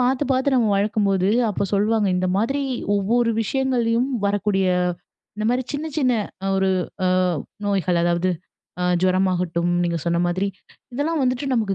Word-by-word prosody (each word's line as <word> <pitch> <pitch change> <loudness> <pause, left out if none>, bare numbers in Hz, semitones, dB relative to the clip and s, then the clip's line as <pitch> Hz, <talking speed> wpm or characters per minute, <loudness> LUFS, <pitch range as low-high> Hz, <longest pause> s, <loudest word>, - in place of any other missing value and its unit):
பார்த்து, 260 +3 +1
பார்த்து 265 +2 +1
நம்ம 235 -4 +3
வளர்க்கும்போது, 200 -2 +1 0.2
அப்போ 200 - -1
சொல்வாங்க, 210 +1 +2
இந்த 185 - 0
மாதிரி 270 +7 0 0.4
ஒவ்வொரு 230 +4 +1
விஷயங்கள்லயும் 245 -1 0 0.2
வரக்கூடிய 200 -1 +1 0.7
இந்தமாரி 240 +4 0
சின்ன, 295 +2 -3
சின்ன 255 -3 +2 0.3
அ - - -1
ஒரு 190 0 +2 0.4
அ - - +3 0.6
நோய்கள் 185 -3 +1
அதாவது 175 +1 +1 0.5
அ - - +1 0.2
ஜுரமாகட்டும், 180 -2 +1
நீங்க 170 -1 0
சொன்ன 170 0 +1
மாதிரி, 185 +3 0 0.5
இதெல்லாம் 305 +4 -1
வந்துட்டு 255 +2 0
நமக்கு 210 -4 0
205 Hz, 140 wpm, -22 LUFS, 185-250 Hz, 0.7 s, நம்ம